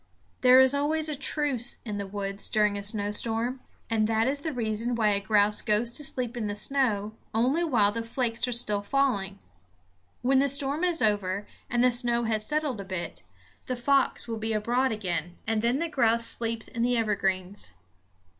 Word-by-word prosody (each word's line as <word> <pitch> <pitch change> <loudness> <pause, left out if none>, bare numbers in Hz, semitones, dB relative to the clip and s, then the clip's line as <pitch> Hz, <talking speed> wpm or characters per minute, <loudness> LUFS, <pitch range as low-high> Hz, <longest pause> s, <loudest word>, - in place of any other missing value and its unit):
There 255 0 +7
is 260 +1 +6
always 305 +2 +1
a 300 - -2
truce 280 -3 0
in 210 -3 -4
the 200 -1 -4
woods 195 0 -5
during 210 -1 +2
a 200 - -3
snowstorm; 225 +4 -1 0.3
and 220 -1 +1
that 225 +1 +1
is 280 +1 -1
the 315 - -3
reason 230 -1 -1
why 220 -2 +2
a 200 -1 +2
grouse 205 +1 +2
goes 220 +3 +1
to 295 - -2
sleep 255 -3 -2
in 225 -3 -2
the 205 - -3
snow 215 -4 0 0.2
only 260 +9 +2
while 230 -11 +3
the 230 +2 -3
flakes 230 +1 -1
are - - -2
still 210 -4 0
falling. 205 -5 0 0.9
When 265 +1 +4
the 280 +1 +2
storm 280 +4 -1
is 350 -2 +1
over 205 -2 0 0.2
and 240 0 +2
the 250 - +5
snow 240 -1 +1
has 220 -2 0
settled 300 -8 -1
a - - -6
bit, 185 -3 -5 0.5
the 255 - -1
fox 275 +2 +1
will 225 -1 -3
be 220 0 -1
abroad 245 +5 +1
again; 175 -5 -3
and 220 0 0
then 235 +3 +1
the 335 +3 -1
grouse 235 -6 +2
sleeps 230 -1 0
in 230 - -5
the 245 +1 +2
evergreens. 195 - -1
230 Hz, 190 wpm, -27 LUFS, 210-260 Hz, 0.9 s, There